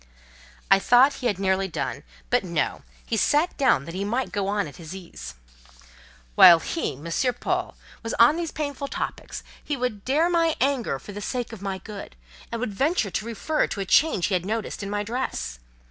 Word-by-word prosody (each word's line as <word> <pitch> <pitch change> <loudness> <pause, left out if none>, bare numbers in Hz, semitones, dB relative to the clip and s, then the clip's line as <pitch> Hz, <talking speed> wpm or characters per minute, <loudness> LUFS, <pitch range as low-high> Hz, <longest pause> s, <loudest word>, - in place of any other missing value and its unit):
I 195 - +8
thought 250 +7 +5
he 250 - +1
had 205 -5 0
nearly 190 0 +1
done: 175 - -4 0.3
but - - +3
no; 170 -4 -1 0.2
he 230 - -1
sat 295 - +2
down 250 - +3
that 165 - -7
he 190 +2 -3
might 240 +6 -1
go 200 -2 -1
on 200 -3 0
at 145 - -12
his 165 +1 -8
ease. 65 - -9 1.0
"While 170 - +9
he, 325 - -3
M. 145 +5 -10 0.3
Paul, - - -2 0.2
was 225 - -3
on 235 +6 +6
these 335 -1 -3
painful 285 -2 -4
topics, - - -5 0.2
he 290 - -2
would 240 -5 -3
dare 300 +6 +2
my 335 -2 +2
anger 260 - +1
for 205 - -11
the 205 +1 -7
sake 245 +2 -3
of 215 - -9
my 195 -1 -3
good, 200 - -9 0.4
and 230 - -3
would 225 -4 -3
venture 270 - +1
to 215 - -2
refer 270 +7 0
to - - -5
a 195 - -2
change 240 - +3
he 205 - -1
had 180 -2 +1
noticed 215 +2 -3
in 200 - -5
my 205 0 -1
dress. 200 - -3
210 Hz, 200 wpm, -25 LUFS, 190-265 Hz, 1.0 s, While